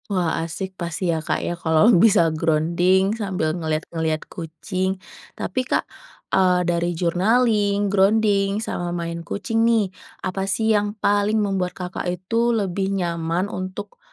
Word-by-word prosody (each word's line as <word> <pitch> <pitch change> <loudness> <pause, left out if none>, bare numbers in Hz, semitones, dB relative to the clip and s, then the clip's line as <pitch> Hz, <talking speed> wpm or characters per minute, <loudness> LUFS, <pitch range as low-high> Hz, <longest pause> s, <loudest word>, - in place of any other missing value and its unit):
Wah, 180 -5 0
asik 185 +4 -5
pasti 170 +1 -1
ya 160 - -2
Kak - - -1
ya, - - -1
kalau 170 +6 +3
bisa 170 -7 +5
grounding 170 +5 +2
sambil 190 -8 -1
ngelihat-ngelihat 160 -1 -2
kucing. 185 +3 -3 0.4
Tapi 255 - -2
Kak, - - +1 0.5
eee, 180 -1 +3
dari 170 0 0
journaling, 205 +3 +2
grounding, 200 0 +3
sama 175 0 -3
main 170 -1 -4
kucing 215 +6 -2
nih, 225 -5 +2 0.3
apa 190 +1 -2
sih 220 +3 +2
yang 205 0 0
paling 205 +1 +2
membuat 195 -4 -1
Kakak 180 -1 -4
itu 210 +7 0
lebih 195 -2 -1
nyaman 170 0 -1
untuk, 185 - -6
185 Hz, 135 wpm, -22 LUFS, 170-205 Hz, 0.5 s, bisa